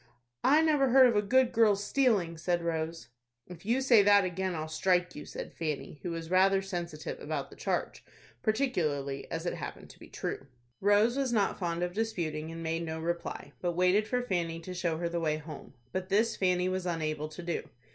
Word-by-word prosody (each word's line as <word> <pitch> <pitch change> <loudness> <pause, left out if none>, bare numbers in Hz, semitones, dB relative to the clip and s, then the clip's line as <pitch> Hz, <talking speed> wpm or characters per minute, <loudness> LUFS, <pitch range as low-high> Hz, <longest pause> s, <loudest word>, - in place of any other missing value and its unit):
"I 300 +4 +5
never 295 -4 +3
heard 260 +1 +8
of 240 -3 +3
a 205 - +4
good 250 +4 +3
girl's 210 -3 +3
stealing," 205 -10 +2
said 170 +1 -1
Rose. 165 0 -3 0.4
"If 180 +2 -12
you 245 +4 +2
say 245 -5 +6
that 200 -1 +5
again, 185 0 -2
I'll 155 0 -3
strike 180 +3 +1
you," 150 - -9
said - - -7
Fanny, 150 -3 -4
who 180 - -4
was 165 0 -5
rather 190 +1 +5
sensitive 175 -5 -5
about - - -4
the - - -12
charge, - - -2 0.4
particularly 160 - -1
as - - -4
it - - -1
happened - - -7
to - - -19
be - - -12
true. 135 - -5 0.3
Rose 205 +5 +3
was 270 -3 0
not 210 -4 +1
fond 170 -2 -1
of 180 0 -2
disputing, 165 -8 -2
and 165 0 -7
made 165 +1 -1
no 160 -1 -4
reply, 170 +1 -4
but 175 -1 0
waited 185 +5 +3
for 250 +2 0
Fanny 170 -7 -1
to 180 +2 -7
show 175 -3 -1
her 170 +1 -1
the 170 0 -2
way 155 -2 0
home. 155 -3 -10 0.2
But 185 +3 -3
this 215 +3 +2
Fanny 180 -1 +1
was 185 0 -2
unable 155 -3 -2
to 175 +3 -9
do. 170 -1 -3
180 Hz, 205 wpm, -30 LUFS, 165-210 Hz, 0.4 s, heard